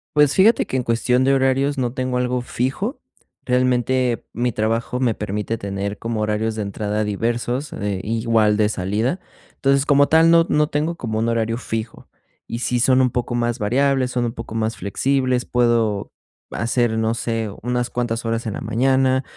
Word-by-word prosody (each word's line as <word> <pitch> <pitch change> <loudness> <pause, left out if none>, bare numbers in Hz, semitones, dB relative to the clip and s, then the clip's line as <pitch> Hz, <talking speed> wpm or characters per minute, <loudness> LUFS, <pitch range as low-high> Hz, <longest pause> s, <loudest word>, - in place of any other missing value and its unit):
Pues 145 -2 +5
fíjate 215 +5 +4
que - - -5
en 130 - +2
cuestión 125 +2 +1
de 135 +1 +3
horarios 135 +2 +1
no 125 -1 -1
tengo 130 -1 -2
algo 125 0 0
fijo. 135 - -3 0.5
Realmente, 125 -1 +1
mi 120 +1 0
trabajo 115 +3 -1
me 120 -4 +2
permite 105 +2 -3
tener 100 +1 -4
como 115 -1 -3
horarios 110 +1 -1
de 110 - -2
entrada 105 +1 -2
diversos, 120 +6 -2
eh, 100 -2 -3
igual 110 -1 +2
de 105 -1 +2
salida. 110 - -1 0.4
Entonces, 140 0 +2
como 145 0 +4
tal, 165 +1 +5
no 165 0 +6
no 150 0 +3
tengo 155 +3 -1
como 110 -7 -3
un 115 +1 0
horario 115 0 0
fijo, 110 -2 -5 0.4
y 115 - -4
sí 125 -1 0
son 130 +2 +4
un 125 -2 +2
poco 120 0 -2
más 120 0 -1
variables, 130 +4 +1
son 125 -1 0
un 115 - -3
poco 115 -1 -8
más 110 +1 -1
flexibles, 130 +5 0
puedo 115 -4 +1 0.4
hacer, 115 0 0
no 110 0 +1
sé, 115 -2 -2
unas 125 +1 -1
cuantas 120 -1 -2
horas 115 +1 -2
en 110 - -3
la - - -5
mañana, 130 +2 +2
120 Hz, 180 wpm, -21 LUFS, 110-130 Hz, 0.5 s, no